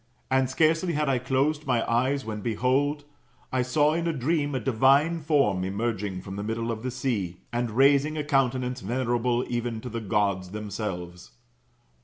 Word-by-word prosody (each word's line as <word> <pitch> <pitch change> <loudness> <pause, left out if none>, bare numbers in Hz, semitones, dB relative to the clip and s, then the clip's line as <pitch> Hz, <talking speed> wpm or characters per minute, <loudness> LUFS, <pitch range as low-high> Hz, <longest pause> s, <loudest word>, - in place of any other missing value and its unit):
And 130 -1 +3
scarcely 165 +5 +2
had 150 0 0
I 130 -2 +2
closed 140 +4 0
my 120 -3 +1
eyes, 130 +4 +1
when 105 -1 -5
behold, 130 +7 0 0.5
[I 130 - +1
saw 145 +4 +2
in 170 +1 -1
a 165 - 0
dream] 145 +1 0
a - - 0
divine 135 +7 +3
form 140 - +2
emerging 100 -1 -2
from 95 +1 -7
the 100 - -3
middle 115 +2 -2
of 110 -1 -4
the 130 - -3
sea, 115 -9 -3
and 120 0 0
raising 140 +6 +3
a 150 - -1
countenance 130 -3 0
venerable 120 +2 0
even 120 -1 -2
to 125 - -6
the 115 0 -4
Gods 100 -3 0
themselves. 95 -4 -6
125 Hz, 170 wpm, -26 LUFS, 110-140 Hz, 0.5 s, And